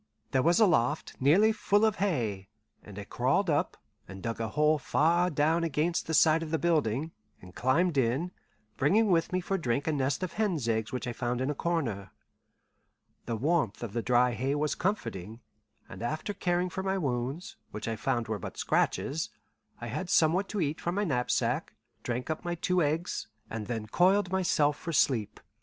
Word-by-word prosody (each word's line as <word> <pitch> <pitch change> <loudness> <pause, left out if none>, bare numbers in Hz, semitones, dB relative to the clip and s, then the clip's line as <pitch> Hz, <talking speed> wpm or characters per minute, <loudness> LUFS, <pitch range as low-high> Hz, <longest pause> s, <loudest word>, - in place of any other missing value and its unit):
There 130 - +3
was 170 - +3
a 220 - +7
loft 150 - +1
nearly 180 +12 +5
full 210 -1 +2
of 220 - +1
hay, 115 - -1 0.3
and 105 -1 -12
I 105 - -5
crawled 135 - +1
up, 145 - 0 0.3
and 95 0 -10
dug 115 -1 -3
a 115 - -1
hole 150 +5 +2
far 170 +6 +2
down 160 +2 +1
against 165 +2 0
the 160 - 0
side 160 +1 +5
of 165 - -5
the 160 - +1
building, 155 -2 0 0.3
and 90 0 -14
climbed 145 - +2
in, 135 +9 0 0.5
bringing 200 +9 +3
with 165 0 +2
me 185 0 0
for 195 +2 -2
drink 130 -2 -1
a 160 - +1
nest 140 +3 0
of 185 - -3
hen's 185 - -1
eggs 110 -1 0
which 125 - -3
I 120 - -3
found 120 0 -2
in 130 +3 0
a - - -1
corner. 130 - -2 1.2
The 115 - -1
warmth 135 - 0
of 110 -4 -5
the 120 - -1
dry 125 +1 +3
hay 130 +4 -1
was 150 0 0
comforting, 115 - -3 0.5
and - - -10
after 155 - -3
caring 180 -1 0
for 190 - -3
my 190 0 -1
wounds, 135 +1 -3
which 105 +1 -6
I 115 - -1
found 120 0 -1
were 110 -1 -2
but - - -7
scratches, - - 0 0.5
I - - -6
had 170 +11 -4
somewhat 170 +6 +3
to 210 - -2
eat 150 0 -1
from 175 +1 -2
my 205 - +1
knapsack, 125 -9 0 0.3
drank 125 +5 -3
up 155 - -3 0.2
two 180 -1 +2
eggs, 160 +3 -1 0.2
and 110 -2 -4
then 115 -3 -3
coiled 185 - +3
myself 155 -6 +2
for 165 - -5
sleep. 120 -8 +1
150 Hz, 190 wpm, -29 LUFS, 120-175 Hz, 1.2 s, a